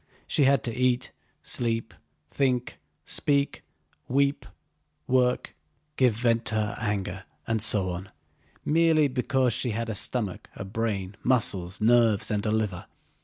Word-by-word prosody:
She 145 - +2
had 135 -2 +3
to 115 - -2
eat, 125 0 +1 0.3
sleep, 115 -2 -2 0.3
think, 125 -3 -1 0.3
speak, 140 -1 0 0.4
weep, 140 +2 +1 0.6
work, 125 -1 +1 0.4
give 125 -6 +3
vent 115 0 +1
to 110 - -2
her 105 -1 -1
anger, 100 -3 -3 0.2
and 115 -1 -1
so 100 -4 +2
on, 90 +2 -6 0.6
merely 160 -1 +4
because 130 -1 +1
she 125 - 0
had 115 +1 -2
a - - -1
stomach, 105 -2 -2
a 100 - -6
brain, 100 -2 -3
muscles, 95 -8 +1
nerves, 110 -2 +3
and 105 -1 0
a - - +1
liver. 105 -5 -1
115 Hz, 135 wpm, -27 LUFS, 105-130 Hz, 0.6 s, merely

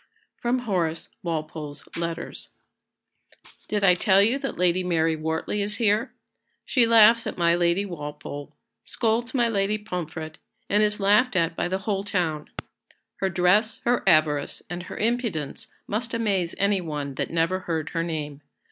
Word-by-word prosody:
[Sidenote: 245 +1 0
Horace 170 -6 -1
Walpole's 155 -3 -5
Letters.] 170 0 -5 1.2
"Did 210 -1 -1
I 185 -2 +7
tell 190 +2 +3
you 230 +7 +3
that 270 - -4
Lady 180 +1 +2
Mary 165 -2 +1
Wortley 160 +6 -2
is 205 +1 -1
here? 220 +1 +2 0.5
She 245 -4 +4
laughs 230 0 +6
at - - -5
my 170 -1 +3
Lady 175 +3 +2
Walpole, 150 -4 -7 0.3
scolds 235 +2 0
my 240 -2 +3
Lady 205 -1 +1
Pomfret, 165 -5 -6 0.3
and 205 +1 +2
is 210 0 +1
laughed 210 +4 +3
at 165 -1 +1
by - - -1
the 185 +2 -1
whole 200 -2 -1
town. 165 -7 -1 0.7
Her 190 - 0
dress, 190 +5 +2
her 240 +1 +2
avarice, 155 -4 +2
and 175 0 -4
her 175 - -9
impudence 220 - -2 0.2
must 230 +3 -2
amaze 195 -7 0
any 200 -1 +2
one 150 -4 -4
that - - -3
never 165 +3 +1
heard 165 -4 -3
her 165 - -2
name. 150 -4 -4
185 Hz, 155 wpm, -25 LUFS, 165-215 Hz, 1.2 s, I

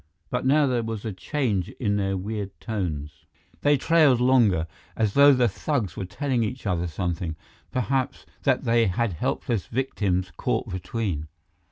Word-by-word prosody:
But 125 +1 0
now 145 +2 +5
there 125 -3 +1
was 115 -1 -5
a 110 - -3
change 105 - -1
in 105 -5 +1
their 95 -1 0
weird 100 0 -5
tones. 80 -10 -4 0.3
They 145 0 +4
trailed 150 -3 +4
longer, 120 -10 +4 0.3
as 110 -3 +1
though 140 +1 +8
the 125 -3 +4
thugs 115 - -2
were 95 - -4
telling 125 +7 -1
each 125 +3 -4
other 90 -3 0
something, 85 -1 -3 0.3
perhaps 130 +1 -1 0.2
that - - +2
they 115 -1 +3
had 100 +2 0
helpless 105 +6 -2
victims 100 -8 -1
caught - - -1
between. 90 -4 -3
110 Hz, 155 wpm, -25 LUFS, 95-125 Hz, 0.3 s, though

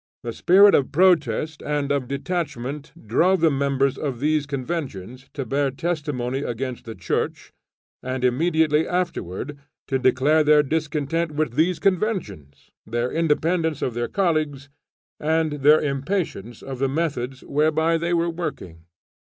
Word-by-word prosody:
The 115 - -4
spirit 195 - +6
of 135 - +2
protest 155 -4 +2
and 145 -1 -2
of 140 -3 0
detachment 140 -2 -4 0.2
drove 180 - +3
the 165 -1 +4
members 140 -1 0
of 135 -5 -3
these 150 +1 +1
Conventions 130 - -5
to 135 - -3
bear 140 +3 0
testimony 140 -4 -2
against 125 -1 -4
the 115 -1 -7
Church, 90 - -3 0.5
and 130 0 -4
immediately 155 +3 +2
afterward, 145 - -3 0.3
to 135 -1 +1
declare 135 +5 +3
their 150 0 +5
discontent 155 +1 -1
with 150 -5 -1
these 165 +5 +2
Conventions, 175 - -2
their 120 +2 -2
independence 160 -1 0
of 125 - -1
their 120 +1 -2
colleagues, 155 -7 -1 0.5
and 155 -1 0
their 150 +3 +6
impatience 140 - -3
of 135 -2 -7
the 135 0 +1
methods 135 -4 -2
whereby 160 +3 +1
they 170 +1 -2
were 170 0 +2
working. 150 - -6
145 Hz, 135 wpm, -23 LUFS, 130-165 Hz, 0.5 s, spirit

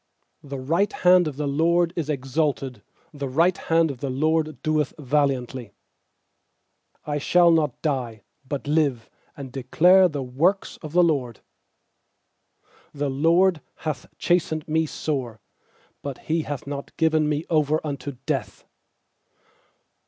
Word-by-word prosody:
16The 140 -1 -6
right 185 +6 +2
hand 180 -1 +4
of 145 -3 -5
the 150 - -2
LORD 170 +4 +2
is 160 -4 -3
exalted; 135 -3 -2 0.3
The 140 -2 -4
right 170 +7 +3
hand 165 -1 +1
of 130 - -10
the 140 - -3
LORD 155 +1 0
doeth 155 -3 0
valiantly. 130 -5 -1 1.3
17I 145 -1 -2
shall 175 +2 +5
not 155 -6 +1
die, 125 -8 -2 0.2
but 140 +1 -5
live, 145 -6 +1 0.3
And 135 -3 -8
declare 175 +9 +4
the 145 -3 -4
works 160 +11 0
of 155 -1 -9
the 180 0 +5
LORD. 135 -9 0 1.5
18The 140 -1 -2
LORD 170 0 +4 0.2
hath 150 -5 -3
chastened 160 -3 0
me 160 0 +1
sore; 130 -8 -3 0.6
But 140 -2 -5
He 160 +1 -1
hath 150 -1 -5
not 140 0 -7
given 155 -2 +2
me 150 +1 -1
over 155 -1 +2
unto 140 -2 -5
death. - - -3
150 Hz, 130 wpm, -24 LUFS, 135-160 Hz, 1.5 s, shall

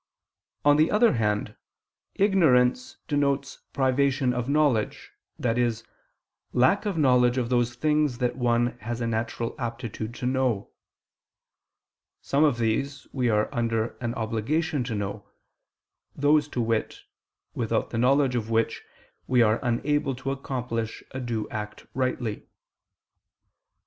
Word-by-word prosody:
On 145 0 +6
the 155 +1 +4
other 225 +2 +4
hand, 105 -3 -1 0.6
ignorance 130 -11 +3
denotes 140 -2 0
privation 135 0 +1
of 125 +1 -3
knowledge, 140 -7 +1 0.3
i.e. 120 0 +2 0.8
lack 165 - +3
of 195 -5 -2
knowledge 125 -4 +4
of 120 -2 0
those 120 -1 +1
things 150 -1 +1
that 125 -1 -1
one 120 -1 +1
has 120 +1 -4
a 120 - -1
natural 115 +1 -2
aptitude 115 -2 -5
to 125 - -5
know. 130 -5 0 1.5
Some 140 +2 +1
of 145 -6 +3
these 130 +4 -1
we 125 -3 +1
are 105 -1 +2
under 115 -2 -1
an 120 0 -2
obligation 130 +7 -1
to 115 -3 -3
know, 100 0 -5 0.9
those, 145 +1 +3
to 125 - -2
wit, 115 -1 -1 0.5
without - - -1
the 115 - -2
knowledge 135 +1 +3
of 115 -3 -2
which 115 0 0 0.5
we 125 -2 +4
are 110 +1 +2
unable 135 +3 0
to 135 +2 -4
accomplish 125 -4 -4
a 130 - -5
due 115 -4 -3
act 105 -2 -6
rightly. 125 -4 -2
125 Hz, 130 wpm, -26 LUFS, 115-140 Hz, 1.5 s, On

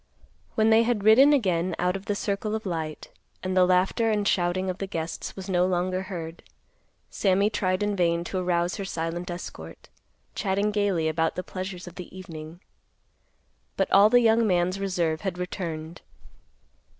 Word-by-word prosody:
When 220 0 +3
they 220 +1 +6
had 230 -3 0
ridden 245 +7 +7
again 185 - +1
out 180 +1 0
of 195 +1 -6
the 205 - -1
circle 205 +1 -2
of 220 - -5
light, 160 -4 -4 0.3
and 185 0 -2
the 180 -1 +5
laughter 185 +5 +2
and 210 -2 +1
shouting 180 +1 +1
of 185 0 -3
the 195 - -3
guests 165 -2 -5
was 190 -1 -8
no 180 -2 +2
longer 185 0 0
heard, 170 -4 -7 0.7
Sammy 200 +1 +2
tried 185 -2 0
in 205 0 0
vain 170 -2 +1
to 185 +2 -3
arouse 175 0 0
her 200 - -4
silent 170 -1 -4
escort, 175 0 -8 0.4
chatting 200 +1 0
gaily 200 -6 +1
about 160 +1 0
the 180 - -3
pleasures 185 -1 -6
of 175 - -10
the 180 0 -9
evening. 165 -2 -9 1.2
But - - 0
all 200 +2 +7
the 245 +2 +5
young 225 0 +4
man's 180 0 +1
reserve 175 -5 -1
had 190 -3 -3
returned. 170 -3 -5
185 Hz, 170 wpm, -26 LUFS, 175-200 Hz, 1.2 s, ridden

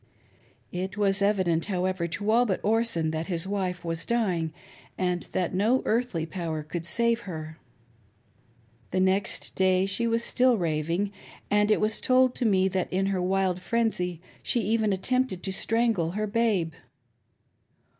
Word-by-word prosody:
It 190 +2 -4
was 200 -1 +2
evident, 185 -5 +2
however, 185 -2 -1
to 205 +5 -2
all 240 +2 +4
but 190 - 0
Orson 215 -7 +1
that 160 +1 -3
his 170 -3 -2
wife 185 -3 -2
was 165 0 -2
dying, 185 -9 0 0.5
and 180 -1 0
that 180 -1 -1
no 220 +8 +2
earthly 220 -8 0
power 165 -2 -4
could 170 +2 -5
save 235 +3 +2
her. 155 -1 -7 1.3
The 185 - -1
next 190 +1 +1
day 185 0 +3
she 200 +4 +1
was 230 0 +1
still 250 -1 +3
raving, 170 +3 -1 0.4
and 210 0 +3
it 215 - +4
was 215 +1 0
told 255 0 +3
me 190 -5 +3
that 185 -1 -2
in 190 +1 +1
her 185 - 0
wild 185 0 0
frenzy 185 -6 -1 0.2
she 240 - +1
even 215 0 +1
attempted 235 0 0
to 190 - -2
strangle 225 -6 +1
her 215 +2 -1
babe. 205 -7 +1
190 Hz, 150 wpm, -27 LUFS, 175-220 Hz, 1.3 s, all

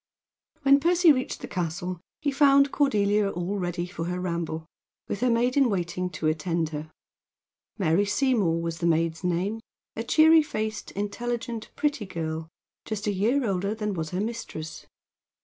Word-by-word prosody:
When 275 0 +6
Percy 345 +2 +5
reached 255 -2 -1
the - - -6
castle 175 0 -3 0.2
he 290 -2 +1
found 280 0 +5
Cordelia 210 -7 +2
all 185 +2 -3
ready 175 -1 -2
for 165 -2 -5
her 180 +1 -2
ramble, 170 -3 -3 0.4
with 200 - -3
her 250 - +2
maid 240 +2 +2
in 275 -3 +4
waiting 180 -2 -2
to 160 -2 -5
attend 160 +1 0
her. 155 0 -6 0.9
Mary 190 0 +2
Seymour 205 - +2
was 165 0 -3
this 170 - +2
maid's 165 +1 0
name, 180 +5 0 0.4
a - - -3
cheery 315 +6 +6
faced, 220 -8 -4
intelligent, 230 +3 -3
pretty 290 -9 -1
girl, 160 -2 -4 0.4
just 215 -2 -4
a 210 - +1
year 235 +8 +1
older 195 +2 -1
than 210 -2 -2
was 160 -3 -3
her 185 +3 -2
mistress. 210 -8 -5
200 Hz, 160 wpm, -26 LUFS, 170-240 Hz, 0.9 s, When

